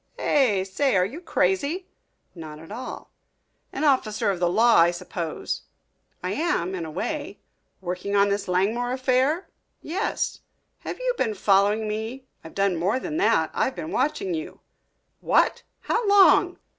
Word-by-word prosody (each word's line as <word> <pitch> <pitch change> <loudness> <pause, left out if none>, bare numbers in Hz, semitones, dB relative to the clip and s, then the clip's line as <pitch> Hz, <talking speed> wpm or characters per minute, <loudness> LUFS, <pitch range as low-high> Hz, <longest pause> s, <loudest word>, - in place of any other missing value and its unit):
"Eh? 230 -10 +2
Say, 205 +7 0
are 180 -1 +4
you 275 - -7
crazy?" 360 -1 0 0.5
"Not 155 -3 -9
at 160 +4 -13
all." 245 +4 -7 0.6
"An 275 - -4
officer 230 -8 +2
of 185 - -4
the 175 -1 +2
law, 230 +6 +4
I 170 +1 +6
suppose." 170 -1 -4 0.6
"I - - -2
am 295 - -1
in 175 -3 -4
a - - -6
way." 290 - -4 0.4
"Working 185 +2 -3
on 200 0 +4
this 200 0 -1
Langmore 220 +7 0
affair?" 260 +6 +1 0.3
"Yes." 380 +8 -2 0.4
"Have - - -6
you - - -1
been 220 -4 0
following 205 +2 +2
me?" 220 +5 -4 0.2
"I've 160 - -12
done 195 -3 +1
more 195 +9 0
than 310 +2 -4
that 365 - +2
I've 260 - 0
been 320 - -6
watching 305 +8 -1
you." 325 +1 -6 0.6
"What! - - +2 0.2
How 465 -2 -1
long?" 385 -2 +5
230 Hz, 155 wpm, -24 LUFS, 190-305 Hz, 0.6 s, I